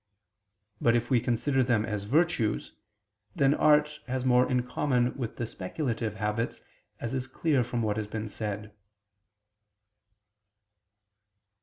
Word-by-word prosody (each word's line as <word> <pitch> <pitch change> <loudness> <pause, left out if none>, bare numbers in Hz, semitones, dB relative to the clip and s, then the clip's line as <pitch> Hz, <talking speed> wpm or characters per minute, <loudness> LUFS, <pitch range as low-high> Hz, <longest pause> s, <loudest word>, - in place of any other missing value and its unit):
But 115 0 +4
if 120 +2 -1
we 125 - +5
consider 130 +3 +1
them 120 -4 +2
as 105 -3 -3
virtues, 140 -3 +1 0.6
then 140 0 +4
art 150 0 +3
has 130 0 -2
more 125 0 +4
in 125 -1 +2
common 125 -1 +1
with 120 -5 -4
the 120 - -2
speculative 115 - -3
habits, 105 +2 -2 0.4
as 115 - -4
is 130 -1 -2
clear 135 0 +1
from 120 -1 -2
what 105 -1 0
has 105 -1 -2
been 110 +1 -4
said. 105 -1 -5
120 Hz, 130 wpm, -29 LUFS, 110-130 Hz, 0.6 s, we